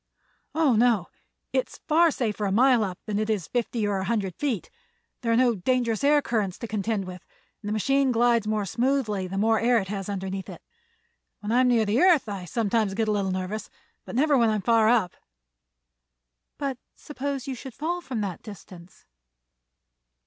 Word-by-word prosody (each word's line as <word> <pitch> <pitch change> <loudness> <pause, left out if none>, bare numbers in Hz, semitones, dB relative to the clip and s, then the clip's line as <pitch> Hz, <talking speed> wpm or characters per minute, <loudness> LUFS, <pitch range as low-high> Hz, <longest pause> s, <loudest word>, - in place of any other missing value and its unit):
"Oh, 310 -7 +3
no; 225 -5 +2 0.4
it - - +1
is - - -13
far 330 +2 +5
safer 220 -7 -2
a 195 - 0
mile 245 +2 +4
up 185 -3 -4
than 210 -1 -2
it 215 0 -1
is 205 -7 0
fifty 235 -2 -1
or 200 -1 0
a 190 - -3
hundred 195 -4 -1
feet. 265 -9 -3 0.5
There 230 -2 0
are - - +4
no 245 -1 +4
dangerous 230 +3 0
air 290 0 +4
currents 210 -6 -1
to 235 - -6
contend 210 -1 -2
with 180 -1 -9 0.4
and 205 - -5
the - - -2
machine 270 +5 +2
glides 235 -2 +2
more 215 -1 0
smoothly 230 -4 0
the 195 +2 -5
more 220 +2 +3
air 240 +1 +3
it 190 -4 -2
has 195 -1 -4
underneath 190 -1 -4
it. - - -10 0.8
When 210 +1 -4
I 245 - +4
am 255 - +3
near 235 -3 +3
the 210 +4 +1
earth 350 -9 +5
I 195 -3 -5
sometimes 215 +1 0
get 220 0 0
a - - +3
little 200 -2 0
nervous, 185 +3 -4 0.3
but - - -8
never 290 +3 +3
when 235 -3 +4
I'm 215 -3 -1
far 225 +1 +4
up." 220 -7 +2 1.4
"But 275 -3 -3 0.2
suppose 280 -2 -5
you 270 - -4
should 255 0 -9
fall 345 +4 -2
from 255 -9 -4
that 190 -4 -4
distance?" 185 -4 -13
225 Hz, 190 wpm, -26 LUFS, 200-250 Hz, 1.4 s, far